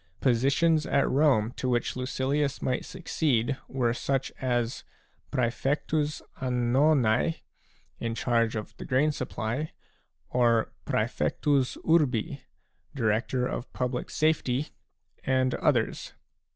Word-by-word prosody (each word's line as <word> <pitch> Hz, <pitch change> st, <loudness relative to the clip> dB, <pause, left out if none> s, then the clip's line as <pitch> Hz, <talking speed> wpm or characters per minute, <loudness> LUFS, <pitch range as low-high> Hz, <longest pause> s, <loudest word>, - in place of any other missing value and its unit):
Positions 140 Hz, +6 st, +3 dB
at 140 Hz, 0 st, +2 dB
Rome 130 Hz, -6 st, +3 dB
to 130 Hz, -, -1 dB
which 120 Hz, -1 st, 0 dB
Lucilius 135 Hz, +2 st, -1 dB
might 125 Hz, -, -1 dB
succeed 145 Hz, -8 st, 0 dB
were 125 Hz, -3 st, 0 dB
such 135 Hz, +2 st, -1 dB
as 120 Hz, -2 st, -1 dB, 0.5 s
'praefectns 145 Hz, +5 st, 0 dB, 0.2 s
annonae, 125 Hz, +2 st, +2 dB, 0.6 s
in 115 Hz, -1 st, -2 dB
charge 115 Hz, -1 st, +1 dB
of 110 Hz, -, -5 dB
the -, -, -7 dB
grain 140 Hz, +4 st, +2 dB
supply, 130 Hz, +2 st, -3 dB, 0.6 s
or 115 Hz, -2 st, +3 dB, 0.2 s
praefectus 140 Hz, -3 st, 0 dB
urbU 140 Hz, -5 st, +2 dB, 0.6 s
Director 120 Hz, +1 st, +1 dB
of 125 Hz, -, -4 dB
Public 125 Hz, -1 st, -2 dB
Safety, 150 Hz, -3 st, +1 dB, 0.5 s
and 130 Hz, -1 st, +2 dB
others. -, -, 0 dB
130 Hz, 100 wpm, -28 LUFS, 120-145 Hz, 0.6 s, Positions